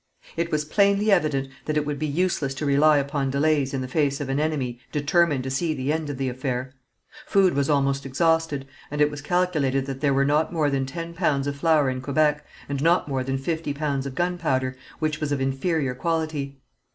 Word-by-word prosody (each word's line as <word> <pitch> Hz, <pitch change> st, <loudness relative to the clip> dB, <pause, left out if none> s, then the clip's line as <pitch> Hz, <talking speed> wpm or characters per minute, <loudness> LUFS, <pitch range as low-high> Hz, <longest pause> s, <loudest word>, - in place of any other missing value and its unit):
It 170 Hz, 0 st, -2 dB
was 150 Hz, -1 st, 0 dB
plainly 200 Hz, +5 st, +3 dB
evident 150 Hz, -7 st, +2 dB, 0.2 s
that 155 Hz, 0 st, -1 dB
it 150 Hz, -, +1 dB
would 145 Hz, -1 st, -3 dB
be 155 Hz, -, -1 dB
useless 150 Hz, -3 st, 0 dB
to 150 Hz, -, -3 dB
rely 145 Hz, +2 st, +5 dB
upon 140 Hz, -1 st, -1 dB
delays 140 Hz, 0 st, +1 dB
in 135 Hz, -, -2 dB
the 130 Hz, -, -4 dB
face 140 Hz, 0 st, 0 dB
of 145 Hz, -2 st, -4 dB
an 135 Hz, +1 st, 0 dB
enemy 140 Hz, -6 st, -1 dB
determined 150 Hz, -1 st, +2 dB
to 130 Hz, -, -4 dB
see 155 Hz, +4 st, 0 dB
the 135 Hz, +2 st, -1 dB
end 160 Hz, -2 st, -2 dB
of 145 Hz, -, -4 dB
the 135 Hz, 0 st, -1 dB
affair. 130 Hz, 0 st, -3 dB, 0.5 s
Food 195 Hz, -2 st, +4 dB
was 140 Hz, +1 st, 0 dB
almost 140 Hz, -1 st, +1 dB
exhausted, 160 Hz, 0 st, +1 dB, 0.2 s
and 150 Hz, -, -4 dB
it 150 Hz, 0 st, +4 dB
was 145 Hz, -1 st, -7 dB
calculated 150 Hz, -5 st, +1 dB
that 135 Hz, -1 st, -6 dB
there 145 Hz, -2 st, +3 dB
were 140 Hz, 0 st, +3 dB
not 150 Hz, +3 st, +2 dB
more 155 Hz, -4 st, +1 dB
than 135 Hz, -1 st, 0 dB
ten 165 Hz, +5 st, -6 dB
pounds 150 Hz, -6 st, +1 dB
of 145 Hz, 0 st, -2 dB
flour 155 Hz, -1 st, +3 dB
in 130 Hz, 0 st, -2 dB
Quebec, 150 Hz, +2 st, +1 dB, 0.2 s
and 140 Hz, -1 st, -3 dB
not 170 Hz, +1 st, +3 dB
more 135 Hz, -2 st, -1 dB
than 135 Hz, +1 st, -1 dB
fifty 160 Hz, +1 st, -3 dB
pounds 140 Hz, -2 st, -1 dB
of 130 Hz, -, -7 dB
gunpowder, 155 Hz, -8 st, 0 dB, 0.2 s
which 155 Hz, -2 st, -1 dB
was 150 Hz, -1 st, -1 dB
of 145 Hz, -, 0 dB
inferior 135 Hz, +1 st, 0 dB
quality. 155 Hz, -1 st, -2 dB
145 Hz, 215 wpm, -24 LUFS, 135-160 Hz, 0.5 s, rely